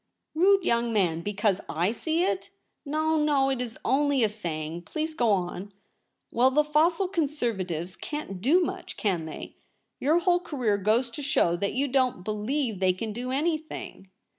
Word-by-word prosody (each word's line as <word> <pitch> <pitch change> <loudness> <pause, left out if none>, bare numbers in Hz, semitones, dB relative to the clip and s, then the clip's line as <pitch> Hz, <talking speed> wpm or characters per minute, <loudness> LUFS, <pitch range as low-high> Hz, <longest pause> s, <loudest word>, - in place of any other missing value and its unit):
' - - -54
Rude 385 +4 +4
young 235 -3 +2
man! 175 -7 +1
because 205 0 0 0.2
/ 200 +7 +2
see 325 +5 0
it 380 +1 -1
?' - - -49
' - - -53
No, 315 +2 +1
no; 275 -3 +3
it 260 -2 -1
is 235 -2 -5
only 275 0 +2
a 220 - +3
saying. 170 -5 -4
Please 315 - -4
go 240 -6 +1
on.' 190 0 -1 0.3
' - - -51
Well, 250 +3 +4
the 300 +3 +3
fossil 325 +5 +2
Conservatives 230 - -2
can't 295 -12 -6
do 315 - +4
much, - - -5
can 180 -6 0
they? 160 - -8 0.4
Your 305 +5 +3
whole 350 0 +3
career 250 - -1
goes 225 +5 +1
to 265 - -6
show 180 -11 +2
that 200 +3 -1
you 275 +2 +1
don't 255 -7 +1
believe 215 +2 -2
they 185 -1 +3
can 215 +3 -5
do 245 +3 -4
any 310 +5 +1
thing.' 305 -10 -9
245 Hz, 190 wpm, -27 LUFS, 200-300 Hz, 0.4 s, Rude